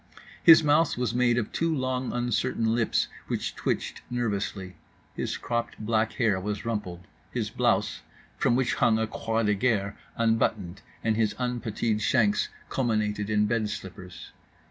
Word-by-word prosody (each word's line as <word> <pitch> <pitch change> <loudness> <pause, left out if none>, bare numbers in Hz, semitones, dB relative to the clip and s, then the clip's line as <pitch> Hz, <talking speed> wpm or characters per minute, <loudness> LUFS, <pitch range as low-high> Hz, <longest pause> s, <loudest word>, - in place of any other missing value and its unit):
His 165 -1 +8
mouth 150 0 +3
was 125 -1 -1
made 120 -1 +3
of 110 -3 -1
two 165 0 0
long 130 -1 -1
uncertain 120 -2 0
lips 115 -1 +1 0.2
which - - -3
twitched - - -2
nervously. 100 -6 -3 0.4
His - - -3
cropped 120 0 -3
black 110 0 0
hair 105 -6 +1
was 105 +2 -4
rumpled; 105 -6 -3 0.3
his - - -3
blouse, - - +1 0.3
from 120 - +2
which 130 -1 +1
hung 110 -2 +3
a 110 - +1
croix 115 +1 -2
de 105 -1 +3
guerre, 100 -2 0 0.2
unbuttoned; 110 -5 0 0.2
and 110 -1 +2
his 110 -2 +1
unputteed 115 -3 -1
shanks 110 -1 +2 0.2
culminated 105 -4 -1
in 105 -1 +3
bed 110 -1 0
slippers. 90 -2 -8
110 Hz, 145 wpm, -27 LUFS, 105-120 Hz, 0.4 s, His